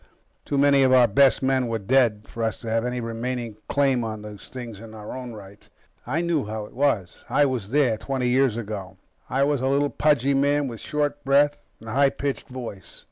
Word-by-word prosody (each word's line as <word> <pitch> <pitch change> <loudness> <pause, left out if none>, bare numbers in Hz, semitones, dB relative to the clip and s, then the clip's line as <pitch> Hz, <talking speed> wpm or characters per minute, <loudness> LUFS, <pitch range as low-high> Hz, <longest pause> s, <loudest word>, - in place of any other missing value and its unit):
Too 140 - -1
many 140 0 +5
of 130 -1 +4
our 130 -1 +7
best 135 +5 +4
men 130 -1 +2
were 115 -1 -1
dead 110 -1 +2
for 115 - -7
us 110 -1 -1
to 115 - -5
have 115 +1 +1
any 125 0 -2
remaining 115 -1 -4
claim 135 -4 +2
on 110 -2 -5
these 105 -1 -10
things 120 -5 -8
in 110 0 -11
our 105 +2 -8
own 125 -2 -7
right. 100 -1 -13 0.4
I 150 +7 0
know 170 -4 0
how 110 0 -5
it - - -15
was. 120 -9 0
I 145 - +4
was 125 -7 -2
there, 130 -5 +2
twenty 130 -2 -2
years 125 -2 +2
ago. 105 -5 -6 0.3
I 135 +2 +2
was 145 -2 +1
a 130 - 0
little, 140 +1 +1
pudgy 140 -3 +2
man 140 +1 +2
with 115 -3 -7
short 145 -1 -2
breath 145 +1 +3 0.2
and 115 - -10
a - - -4
high 140 +1 +4
pitched 140 0 -4
voice. 120 -7 -8
125 Hz, 215 wpm, -24 LUFS, 110-140 Hz, 0.4 s, our